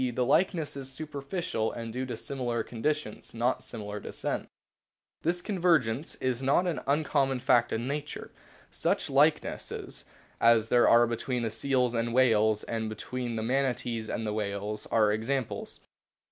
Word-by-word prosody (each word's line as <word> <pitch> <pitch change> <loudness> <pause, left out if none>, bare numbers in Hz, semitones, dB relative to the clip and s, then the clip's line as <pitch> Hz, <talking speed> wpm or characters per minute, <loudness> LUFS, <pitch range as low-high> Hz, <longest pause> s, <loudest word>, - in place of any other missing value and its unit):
the 125 - +1
likeness 165 +2 +2
is 135 -1 -6
superficial 140 - -3
and 115 -1 -6
due 130 +1 -3
to 120 - -4
similar 120 -3 -2
conditions, 120 0 -3
not 120 +3 +1
similar 105 -3 -6
descent. - - -4 0.7
This 175 +2 -1
convergence 165 - +1
is 130 -1 -1
not 140 +7 +3
an 175 -4 -1
uncommon 140 -2 +2
fact 120 -1 +3
in 115 +2 -2
nature. 145 +1 -4 0.4
Such - - -1
likenesses - - 0 0.3
as 115 -1 +5
there 120 - +5
are 120 +1 +7
between 120 +1 -2
the 115 - -1
seals 125 +1 +1
and 115 0 0
the - - -3
whales 110 -4 +4
and 110 -1 -3
between 120 +2 -4
the 110 - -2
Manatees 120 -3 -1
and 110 - -2
the 105 - -1
whales 105 0 -3
are 110 -2 +3
examples. 115 +3 -3
120 Hz, 150 wpm, -29 LUFS, 110-140 Hz, 0.7 s, are